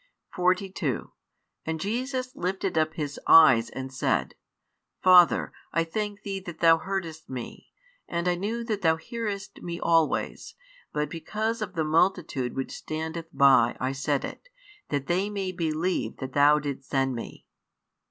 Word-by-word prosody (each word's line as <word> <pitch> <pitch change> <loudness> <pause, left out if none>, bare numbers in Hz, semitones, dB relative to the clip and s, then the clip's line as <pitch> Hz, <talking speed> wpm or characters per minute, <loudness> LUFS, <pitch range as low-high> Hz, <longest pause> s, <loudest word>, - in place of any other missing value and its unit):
42 180 - -1 0.5
And 160 0 -3
Jesus 255 - -3
lifted 190 +1 -2
up 155 0 +1
His 145 -2 -4
eyes, 120 -8 +7
and 130 0 -7
said, - - 0 0.7
Father, 180 -2 +6 0.2
I 165 - +2
thank 205 +4 -4
Thee 195 -1 -3
that 175 -4 -9
Thou 165 -1 +6
heardest 170 -4 -5
Me. 125 -3 -7 0.4
And 170 +1 -2
I 180 - +3
knew 215 +6 -3
that 215 -3 -3
Thou 160 -3 +4
hearest 205 +2 -5
Me 170 0 -5
always: 165 -2 0 0.4
but 150 0 -1
because 215 +9 -3
of 195 -3 -4
the 160 - +1
multitude 160 -5 +1
which 135 - -3
standeth 160 +1 -5
by 135 -4 +5
I 130 +1 -1
said 140 +1 -1
it, - - -10 0.4
that 140 -2 -1
they 185 +6 0
may 195 -2 -3
believe 170 +1 -1
that 130 -1 -6
Thou 145 +1 +5
didst 140 -2 -5
send 135 -1 +1
Me. 115 - -8
165 Hz, 150 wpm, -27 LUFS, 145-195 Hz, 0.7 s, eyes